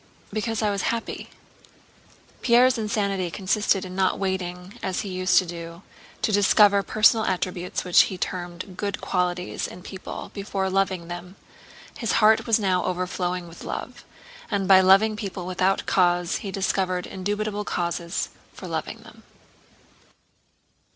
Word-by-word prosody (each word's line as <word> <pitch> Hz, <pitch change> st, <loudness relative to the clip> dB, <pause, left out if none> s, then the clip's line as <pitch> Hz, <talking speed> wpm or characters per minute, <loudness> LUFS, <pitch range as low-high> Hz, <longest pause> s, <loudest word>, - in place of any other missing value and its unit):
because 220 Hz, 0 st, -1 dB
I 210 Hz, -, +2 dB
was 200 Hz, -1 st, -1 dB
happy." 230 Hz, 0 st, -4 dB, 1.1 s
Pierre's 245 Hz, +1 st, +4 dB
insanity 200 Hz, -4 st, -1 dB
consisted 195 Hz, +1 st, 0 dB
in 185 Hz, 0 st, -8 dB
not 190 Hz, -1 st, +1 dB
waiting, 185 Hz, -1 st, -3 dB
as 185 Hz, -, -2 dB
he 205 Hz, -, -6 dB
used 185 Hz, 0 st, +2 dB
to 185 Hz, -, +5 dB
do, 170 Hz, +1 st, -8 dB, 0.4 s
to -, -, +2 dB
discover 205 Hz, 0 st, +5 dB
personal 215 Hz, +2 st, +4 dB
attributes 180 Hz, -1 st, -2 dB
which 180 Hz, -1 st, +6 dB
he 185 Hz, -, -6 dB
termed 180 Hz, +1 st, -5 dB
"good 200 Hz, +1 st, -3 dB
qualities" 180 Hz, 0 st, -1 dB
in 180 Hz, -, -11 dB
people 190 Hz, -1 st, -8 dB
before 195 Hz, -2 st, -2 dB
loving 190 Hz, -3 st, 0 dB
them; 175 Hz, +2 st, -8 dB, 0.6 s
his 230 Hz, -, -1 dB
heart 215 Hz, +2 st, +4 dB
was 225 Hz, -, +4 dB
now 185 Hz, -4 st, +1 dB
overflowing 180 Hz, 0 st, -2 dB
with 165 Hz, -, -12 dB
love, -, -, -6 dB, 0.5 s
and 200 Hz, -3 st, -1 dB
by 190 Hz, -1 st, +8 dB
loving 195 Hz, +4 st, +5 dB
people 195 Hz, -4 st, -5 dB
without 185 Hz, +1 st, 0 dB
cause 175 Hz, -2 st, +2 dB
he 200 Hz, -, -6 dB
discovered 190 Hz, -2 st, -1 dB
indubitable 205 Hz, +2 st, -3 dB
causes 170 Hz, -2 st, -2 dB, 0.2 s
for -, -, -9 dB
loving -, -, -4 dB
them. -, -, -15 dB
190 Hz, 140 wpm, -24 LUFS, 180-205 Hz, 1.1 s, by